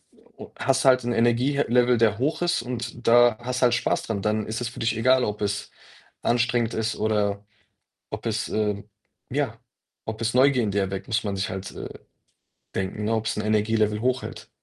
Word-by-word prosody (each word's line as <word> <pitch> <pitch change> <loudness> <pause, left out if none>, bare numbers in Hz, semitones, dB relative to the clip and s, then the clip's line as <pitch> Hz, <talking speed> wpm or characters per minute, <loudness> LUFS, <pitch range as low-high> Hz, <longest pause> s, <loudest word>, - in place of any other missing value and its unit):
äh, - - -25 0.2
o - - -8
o - - -20
hast 135 +1 +1
du 135 - +6
halt 130 -1 +4
'n 120 - -1
Energiehe 120 +5 +2
Level, 125 0 +4
der 110 -2 +3
hoch 145 +8 -1
ist 175 -8 +1
und 120 0 -6
da 120 -1 +6
hast 125 +1 -3
halt 120 -1 +4
Spaß - - 0
dran. 105 -3 -3
Dann 105 0 0
ist 110 +2 -3
es 120 - -2
für 120 - -11
dich 115 -2 0
egal, 130 +2 +4
ob 105 0 -3
es 100 -1 -2 0.5
anstrengend 120 -1 +1
ist 110 0 -1
oder 105 -2 0 0.7
ob - - -6
es, 110 0 -1
ähm 105 -1 -2 0.4
ja, 130 -5 -1 0.5
ob 110 0 -5
es 115 +1 -1
Neugier 130 -1 +4
in 105 - 0
dir 100 -1 0
weckt. 95 0 -5
Muss 110 -1 0
man 100 -1 -2
sich 100 +3 -1
halt, 95 0 -5
äh, - - -7 0.9
denken, 95 +3 -3
ne, 115 +2 +1
ob's 110 0 -1
'n 105 - -2
Energie-Level 105 0 +1
hochhält. 130 +2 -2
115 Hz, 205 wpm, -25 LUFS, 105-125 Hz, 0.9 s, du